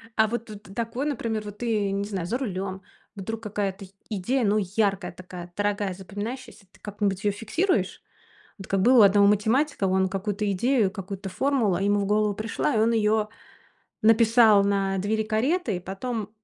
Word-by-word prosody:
А 220 Hz, -, +4 dB
вот 230 Hz, +1 st, -4 dB
вт 205 Hz, -2 st, -11 dB
такой, 235 Hz, +4 st, -2 dB
например, 230 Hz, -7 st, -2 dB
вот 205 Hz, 0 st, -9 dB
ты, 215 Hz, -4 st, 0 dB
не 200 Hz, 0 st, -1 dB
знаю, 195 Hz, -4 st, -4 dB
за 225 Hz, +8 st, -1 dB
рулем. 195 Hz, -6 st, -4 dB, 0.3 s
Вдруг 225 Hz, +3 st, -5 dB
какая-то 200 Hz, -2 st, -3 dB
й 190 Hz, -, -20 dB, 0.2 s
идея, 230 Hz, +5 st, 0 dB
ну, 205 Hz, +1 st, +2 dB
яркая, 200 Hz, -1 st, 0 dB
такая, 180 Hz, 0 st, -10 dB
дорогая, 205 Hz, -1 st, -1 dB
запоминающаяся, 205 Hz, +4 st, -7 dB
ты -, -, -23 dB
как-нибудь 200 Hz, -2 st, -2 dB
её 205 Hz, -, +2 dB
фиксируешь? 320 Hz, -, -1 dB, 0.6 s
Вот 195 Hz, -, -10 dB
как 195 Hz, -1 st, +1 dB
было 250 Hz, +3 st, +6 dB
у -, -, +9 dB
одного 200 Hz, 0 st, +6 dB
математика: 220 Hz, +4 st, +2 dB
он 190 Hz, 0 st, +2 dB
какую-то 200 Hz, +1 st, -2 dB
идею, 220 Hz, +1 st, +2 dB
какую-то 195 Hz, -1 st, -6 dB
формулу, 235 Hz, -2 st, +1 dB
а, 180 Hz, -, -2 dB
ему 205 Hz, +1 st, +2 dB
в -, -, -1 dB
голову 210 Hz, +1 st, +2 dB
пришла, 215 Hz, +3 st, -2 dB
и -, -, +3 dB
он 225 Hz, +2 st, +3 dB
её 215 Hz, -1 st, +2 dB, 0.7 s
написал 225 Hz, -1 st, +5 dB
на 195 Hz, -1 st, 0 dB
двери 215 Hz, +3 st, 0 dB
кареты, 225 Hz, -, 0 dB
и -, -, -5 dB
потом, 205 Hz, +3 st, -5 dB
205 Hz, 180 wpm, -25 LUFS, 195-225 Hz, 0.7 s, у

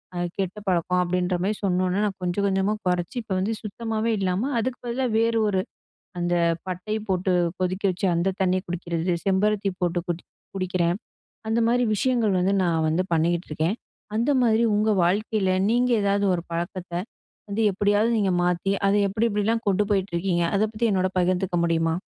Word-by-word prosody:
அ 175 Hz, -, -2 dB, 0.2 s
கெட்ட 195 Hz, +1 st, -2 dB
பழக்கம்." 180 Hz, +1 st, +1 dB
அப்படீன்ற 180 Hz, 0 st, 0 dB
மாரி 210 Hz, +1 st, 0 dB
சொன்னோன்னே, 185 Hz, +1 st, +1 dB
நான் 195 Hz, -2 st, -3 dB
கொஞ்சம் 180 Hz, +3 st, 0 dB
கொஞ்சமா 195 Hz, +2 st, +1 dB
கொறைச்சு, 175 Hz, +2 st, -1 dB
இப்ப 215 Hz, -, -13 dB
வந்து 210 Hz, +4 st, 0 dB
சுத்தமாவே 225 Hz, +1 st, -2 dB
இல்லாம, 190 Hz, +4 st, 0 dB
அதுக்கு 250 Hz, +2 st, -2 dB
பதிலா 255 Hz, +2 st, -1 dB
வேறு 230 Hz, 0 st, +2 dB
ஒரு, 190 Hz, -2 st, +1 dB, 0.6 s
அந்த 175 Hz, 0 st, 0 dB, 0.3 s
பட்டைய 185 Hz, +4 st, -3 dB
போட்டு 185 Hz, 0 st, +1 dB, 0.3 s
கொதிக்க 185 Hz, +2 st, -2 dB
வச்சு 185 Hz, +2 st, -1 dB
அந்த 180 Hz, +3 st, 0 dB
தண்ணிய 185 Hz, 0 st, +1 dB
குடிக்கிறது 170 Hz, 0 st, -2 dB
செம்பருத்தி 195 Hz, +1 st, +2 dB
போட்டு 175 Hz, 0 st, +1 dB
குடி 175 Hz, 0 st, -3 dB, 0.3 s
குடிக்கிறேன். 180 Hz, -2 st, 0 dB, 0.5 s
அந்த 230 Hz, +1 st, +2 dB
மாரி 245 Hz, +1 st, +2 dB
விஷயங்கள் 225 Hz, -4 st, +1 dB
வந்து 190 Hz, +2 st, +2 dB
நான் 165 Hz, -2 st, +1 dB
வந்து 160 Hz, +3 st, +1 dB
பண்ணிகிட்டு 170 Hz, +2 st, 0 dB
இருக்கேன். 160 Hz, +6 st, 0 dB, 0.4 s
அந்த 235 Hz, +6 st, +2 dB
மாதிரி 230 Hz, -1 st, +3 dB
உங்க 215 Hz, +1 st, +2 dB
வாழ்க்கையில, 200 Hz, +2 st, +1 dB, 0.2 s
நீங்க 245 Hz, +2 st, +2 dB
ஏதாவது 200 Hz, 0 st, +1 dB
ஒரு 170 Hz, -, -1 dB
பழக்கத்தை, 175 Hz, +1 st, -3 dB, 0.5 s
வந்து 205 Hz, +2 st, -1 dB
எப்படியாவது 205 Hz, +3 st, +2 dB
நீங்க 200 Hz, -3 st, +2 dB
மாத்தி 180 Hz, +2 st, +1 dB
அதை 200 Hz, +1 st, +3 dB
எப்படி 215 Hz, +4 st, 0 dB
எப்படிலாம் 220 Hz, +2 st, 0 dB
கொண்டு 200 Hz, +1 st, +3 dB
போயிட்டு 195 Hz, -2 st, 0 dB
இருக்கீங்க? 175 Hz, 0 st, +1 dB
அதை 200 Hz, +2 st, +3 dB
பத்தி 230 Hz, +2 st, 0 dB
என்னோட 185 Hz, -2 st, +1 dB
பகிர்ந்துக்க 180 Hz, 0 st, +1 dB
முடியுமா? 165 Hz, -1 st, +1 dB
190 Hz, 165 wpm, -24 LUFS, 180-210 Hz, 0.6 s, மாதிரி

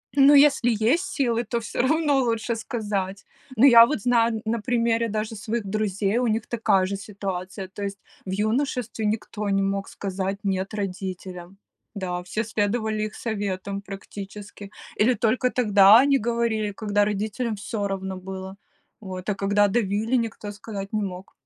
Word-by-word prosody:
Ну 280 Hz, +1 st, +7 dB
если 280 Hz, -4 st, +5 dB
есть 235 Hz, -, +2 dB
силы, 240 Hz, -7 st, 0 dB
то 235 Hz, +1 st, -2 dB
всё 225 Hz, -, -2 dB
равно 295 Hz, 0 st, +2 dB
лучше 230 Hz, -1 st, -1 dB
сказать. 205 Hz, -5 st, -3 dB, 0.3 s
Но 260 Hz, -, +6 dB
я 235 Hz, -3 st, +9 dB
вот 260 Hz, -6 st, -2 dB
знаю 235 Hz, -1 st, +3 dB
н 215 Hz, -, -4 dB
на 230 Hz, +1 st, 0 dB
примере 230 Hz, -1 st, +1 dB
даже 215 Hz, +1 st, -3 dB
своих 220 Hz, +1 st, -3 dB
друзей, 200 Hz, +1 st, 0 dB
у 250 Hz, -1 st, +1 dB
них 220 Hz, 0 st, 0 dB
такая 210 Hz, -5 st, +2 dB
же 200 Hz, +1 st, -3 dB
ситуация, 195 Hz, -2 st, -5 dB
то 200 Hz, +2 st, -8 dB
есть 200 Hz, 0 st, -4 dB, 0.3 s
в 190 Hz, -, -5 dB
юношестве 225 Hz, +1 st, -1 dB
никто 210 Hz, -1 st, -2 dB
не 195 Hz, 0 st, +2 dB
мог 195 Hz, 0 st, -1 dB
сказать 195 Hz, 0 st, -3 dB
"нет" 190 Hz, +1 st, -1 dB
родителям. 185 Hz, -2 st, -5 dB, 0.4 s
Да, 180 Hz, -2 st, -3 dB
все 215 Hz, +5 st, -2 dB
следовали 215 Hz, 0 st, -1 dB
их 215 Hz, 0 st, -5 dB
советам 200 Hz, -3 st, -3 dB
практически. 200 Hz, 0 st, -9 dB, 0.3 s
Или 250 Hz, +4 st, +5 dB
только 250 Hz, +3 st, +1 dB
тогда 210 Hz, -4 st, +6 dB
они 280 Hz, -1 st, +3 dB
говорили, 225 Hz, -2 st, 0 dB
когда 205 Hz, 0 st, +1 dB
родителям 215 Hz, +3 st, -2 dB
всё 205 Hz, 0 st, -3 dB
равно 190 Hz, -1 st, -4 dB
было, 190 Hz, +1 st, -7 dB, 0.5 s
вот, 185 Hz, -1 st, -7 dB
а -, -, +2 dB
когда 205 Hz, +1 st, +2 dB
давили- 215 Hz, +3 st, 0 dB
никто 225 Hz, -3 st, -3 dB
сказать 200 Hz, -1 st, -7 dB
не 215 Hz, -, +1 dB
мог. 185 Hz, -1 st, -6 dB
210 Hz, 160 wpm, -24 LUFS, 195-230 Hz, 0.5 s, я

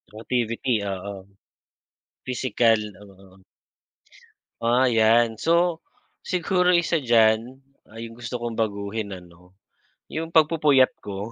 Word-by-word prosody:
Motivity 120 Hz, +2 st, -2 dB, 0.2 s
oo. 100 Hz, +2 st, -7 dB, 1.1 s
Pisikal 120 Hz, -3 st, +1 dB, 0.2 s
oo. 95 Hz, -1 st, -18 dB, 1.3 s
Ah 120 Hz, +2 st, +2 dB
iyan, 115 Hz, 0 st, +3 dB
so, 170 Hz, 0 st, +2 dB, 0.4 s
siguro 180 Hz, 0 st, +1 dB
isa 170 Hz, -1 st, +1 dB
diyan, 115 Hz, +1 st, +2 dB, 0.2 s
ah 110 Hz, -, -18 dB
'yung 115 Hz, 0 st, -7 dB
gusto 120 Hz, +1 st, -6 dB
kong 120 Hz, -1 st, -4 dB
baguhin 100 Hz, 0 st, -2 dB
ano, 90 Hz, +1 st, -17 dB, 0.6 s
yung 165 Hz, +1 st, -5 dB
pagpupuyat 150 Hz, -4 st, +4 dB
ko. 100 Hz, +2 st, -7 dB
115 Hz, 100 wpm, -24 LUFS, 110-135 Hz, 1.3 s, pagpupuyat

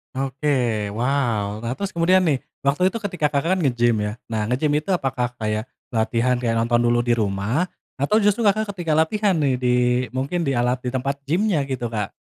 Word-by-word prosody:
Oke, 130 Hz, -6 st, -1 dB
wow. 115 Hz, -3 st, -1 dB
Nah, 115 Hz, -, -2 dB
terus 195 Hz, +8 st, -4 dB
kemudian 175 Hz, +3 st, +4 dB
nih 155 Hz, -8 st, +1 dB, 0.2 s
waktu 145 Hz, +7 st, +2 dB
itu 230 Hz, -, -4 dB
ketika 180 Hz, -8 st, -1 dB
Kakak 165 Hz, +6 st, +1 dB
kan -, -, -2 dB
ngegim 120 Hz, -3 st, +2 dB
ya? 105 Hz, +3 st, -4 dB
Nah, 110 Hz, -2 st, -2 dB
ngegim 125 Hz, +7 st, 0 dB
itu 155 Hz, +6 st, -1 dB
apakah 130 Hz, -7 st, 0 dB
kayak 110 Hz, 0 st, -1 dB, 0.2 s
latihan 115 Hz, +2 st, +1 dB
kayak 115 Hz, -2 st, 0 dB
nonton 120 Hz, +1 st, +2 dB
dulu 120 Hz, 0 st, +3 dB
di 120 Hz, 0 st, +2 dB
rumah 105 Hz, -, 0 dB, 0.3 s
atau 145 Hz, +11 st, +2 dB
justru 210 Hz, +2 st, +2 dB
Kakak 205 Hz, 0 st, +1 dB
ketika 170 Hz, -3 st, -2 dB
latihan 195 Hz, +7 st, +2 dB
nih 135 Hz, -4 st, +2 dB
di, 125 Hz, 0 st, -1 dB, 0.4 s
mungkin 140 Hz, +7 st, -2 dB
di 140 Hz, -, 0 dB
alat 125 Hz, 0 st, 0 dB
di 125 Hz, -, -2 dB
tempat 135 Hz, +2 st, -1 dB
gimnya 170 Hz, +2 st, +1 dB
gitu 130 Hz, -3 st, -3 dB
Kak. 105 Hz, -3 st, -3 dB
130 Hz, 190 wpm, -22 LUFS, 120-165 Hz, 0.4 s, kemudian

